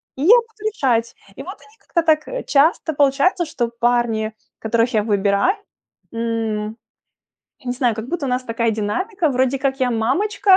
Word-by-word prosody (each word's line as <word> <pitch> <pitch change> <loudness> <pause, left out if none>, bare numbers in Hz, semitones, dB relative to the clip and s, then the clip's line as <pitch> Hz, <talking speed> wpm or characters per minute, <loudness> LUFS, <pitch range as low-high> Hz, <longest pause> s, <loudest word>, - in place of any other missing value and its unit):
и 270 - -7
я 405 +9 +8
буду 455 -3 -2
решать. 235 - 0 0.2
И - - -8
вот 375 - -7
они 430 +1 -21
как-то 340 - -1
так, 310 -1 +2
э, - - -4
часто 315 +3 +2
получается, 285 +6 +2
что 240 -6 -2
парни, 235 -2 +1 0.3
которых 230 +2 0
я 210 -1 +2
выбираю, 200 - +2 0.6
м, 225 -2 -2 0.9
не 245 - -1
знаю, 250 -2 +1
как 220 +2 -6
будто 320 -2 -2
у - - -2
нас 250 +1 0
такая 230 -1 0
динамика, 315 - -1
вроде 260 +1 +1
как 270 0 -1
я 255 -1 +2
мамочка, 380 - +3
255 Hz, 170 wpm, -20 LUFS, 230-335 Hz, 0.9 s, я